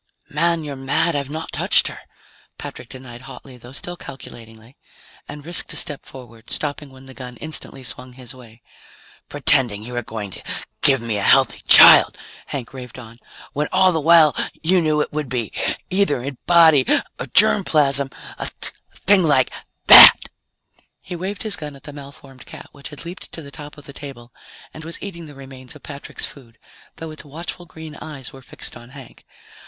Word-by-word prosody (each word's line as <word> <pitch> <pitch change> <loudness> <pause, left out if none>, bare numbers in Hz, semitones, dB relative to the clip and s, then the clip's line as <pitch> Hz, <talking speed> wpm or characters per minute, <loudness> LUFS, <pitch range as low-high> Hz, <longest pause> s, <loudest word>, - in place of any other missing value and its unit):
"Man, 165 +2 0
you're 145 -2 -7
mad; 150 +5 -1
I've 140 -1 -3
not 160 +2 -7
touched - - +3
her!" - - -8 0.6
Patrick 120 - -10
denied 130 -3 -12
hotly 135 -1 -13
though 120 +1 -14
still 175 +6 -6
calculatingly, 115 -5 -13 0.5
and 145 -1 -11
risked 170 0 -1
a - - -5
step 145 -2 +1
forward, 120 -3 -14
stopping 145 -1 -4
when 130 0 -17
the 135 - -13
gun 125 -2 -11
instantly 155 -3 -4
swung 125 0 -6
his 125 -1 -10
way. 115 -3 -17 0.7
"Pretending 130 -7 0
you 125 +2 -9
were 120 - -3
going 110 -3 -8
to - - -10 0.4
give 135 -3 +3
me 115 -3 -3
a - - -4
healthy - - +3
child," - - +8 0.3
Hank 135 -4 -7
raved 125 -2 -10
on, 115 -1 -13 0.3
"when 150 +1 -2
all 185 0 +3
the 160 -2 -2
while 160 -1 +5 0.3
you 180 +2 +3
knew 155 -2 +1
it - - -4
would 150 -3 -4
be 120 -5 -4 0.4
either 185 -10 0
in 135 -2 -7
body 165 -5 +5 0.4
or - - -6
germ 70 - +4
plasm 140 -3 +2 0.3
a - - -4 0.6
thing 200 0 +5
like 145 -6 +2 0.3
that!" - - +11 0.8
He 180 - -9
waved 190 +4 -6
his 215 -4 -2
gun 150 -2 -9
at 135 - -17
the 145 - -10
malformed 140 -2 -14
cat, - - -12
which 140 -1 -10
had 150 +1 -10
leaped 175 +3 -9
to 165 - -9
the 140 - -12
top 150 +1 -12
of 145 - -14
the 140 - -11
table 130 -5 -12 0.4
and 155 - -11
was 165 +1 -8
eating 170 -5 -9
the 145 - -14
remains 130 -2 -13
of - - -16
Patrick's 140 -1 -6
food, 120 -5 -13 0.4
though 160 -1 -9
its 155 - -11
watchful 170 +4 -8
green 160 -1 -11
eyes 140 -5 -9
were 135 - -13
fixed - - -6
on 120 0 -14
Hank. 135 -2 -15
140 Hz, 185 wpm, -20 LUFS, 125-155 Hz, 0.8 s, that